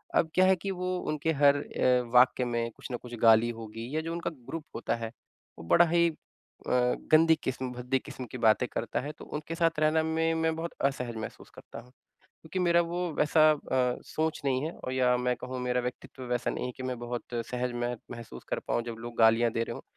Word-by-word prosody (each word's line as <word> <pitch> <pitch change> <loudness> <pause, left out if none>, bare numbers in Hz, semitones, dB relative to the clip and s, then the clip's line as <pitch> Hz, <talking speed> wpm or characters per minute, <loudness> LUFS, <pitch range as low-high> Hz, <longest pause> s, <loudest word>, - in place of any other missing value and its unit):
अब 160 - +3
क्या 185 - +6
है 190 0 +5
कि 195 +2 -4
वो 180 0 -2
उनके 155 +1 0
हर 140 0 +7
अ, 125 -3 +1
वाक्य 125 0 +5
में 120 -1 -1
कुछ 115 - -11
न 120 - -2
कुछ 120 -1 -10
गाली 115 +1 +6
होगी 115 +4 -7
या 160 - +1
जो 165 +1 -5
उनका 170 0 -2 0.2
ग्रुप 165 -2 -5
होता 115 - -1
है 115 -1 -5 0.5
वो - - -8
बड़ा 175 - +7
ही 170 0 +4
अ, 160 - -9 1.0
गंदी 160 +1 +6
किस्म, 130 -1 -3
भद्दी 125 +2 -1
किस्म 130 - -8
की - - -5
बातें 115 +1 +3
करता 115 -1 -2
है 145 +3 -5
तो - - -10
उनके 155 +2 -5
साथ 165 -2 +1
रहना 155 +1 +3
में 160 +1 +1
मैं 160 0 +1
बहुत 165 +1 -4
असहज 125 -4 -1
महसूस 110 - -7
करता - - -10
हूँ। 125 +2 -16 0.5
क्योंकि 160 +4 -5
मेरा 170 -1 +4
वो 175 +1 -2
वैसा 150 +2 +3
अ, 130 -4 0
सोच 160 0 -2
नहीं 130 -1 +1
है 160 - -3
और 130 - -7
या 125 -1 +3
मैं 125 0 0
कहूँ 130 +1 -6
मेरा 125 0 0
व्यक्तित्व 125 +1 -7
वैसा 120 -1 0
नहीं - - -3
है 125 - -3
कि 130 - -6
मैं 130 -1 -3
बहुत 120 0 -4 0.3
सहज 125 0 -1
मह 120 0 -1 0.2
महसूस 115 -2 -9
कर - - -1
पाऊँ 120 - +1
जब 120 -1 -6
लोग 120 0 -8
गालियाँ 115 +1 +5
दे 115 - 0
रहे - - -5
हो। - - -9
130 Hz, 225 wpm, -29 LUFS, 120-160 Hz, 1.0 s, हर